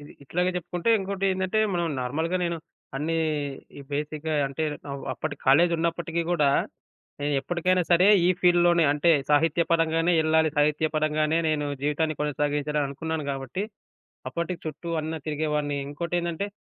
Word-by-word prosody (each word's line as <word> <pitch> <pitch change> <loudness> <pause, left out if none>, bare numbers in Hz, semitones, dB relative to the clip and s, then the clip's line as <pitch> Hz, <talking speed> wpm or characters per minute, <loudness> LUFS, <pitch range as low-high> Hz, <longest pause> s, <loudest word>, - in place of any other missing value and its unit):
ఇది 145 - -12
ఇట్లాగే 180 +5 0
జెప్పుకుంటే 180 +4 -1
ఇంకోటేందంటే, 190 0 -1 0.2
మనం 175 - 0 0.2
నార్మల్‌గా 160 +8 -1
నేను 170 -1 -1 0.4
అన్నీ 160 +4 -1 0.6
ఈ - - -8
బేసిక్‌గా 150 +2 -3
అంటే 135 +3 -4 0.3
అవ్ 140 - -6
అప్పటి 155 -2 -4
కాలేజి 170 +6 +5
ఉన్నప్పటికీ 170 0 -1
గూడా 150 -5 +3 0.7
నేనెప్పడికైనా 170 +6 +1
సరే 175 +2 +5 0.2
ఈ - - +4
ఫీల్డ్‌లోనే 175 -1 +4
అంటే 150 +4 +2 0.2
సాహిత్య 160 +3 +3
పరంగానే 165 +1 +2
యెళ్ళాలి. 160 0 +3
సాహిత్య 150 +1 +2
పరంగానే 155 +1 +1
నేను 150 -1 0 0.2
జీవితాన్ని 155 +2 0
కొనసాగించాలననుకున్నాను 150 +1 -1
గాబట్టి, 135 +7 -4 0.7
అప్పటికి 170 +6 -4
చుట్టూ 160 +2 -5
అన్ని 160 +1 -4
తిరిగేవాన్ని. 150 -1 -1
ఇంకోటేందంటే, 170 +4 -2
160 Hz, 125 wpm, -26 LUFS, 150-170 Hz, 0.7 s, కాలేజి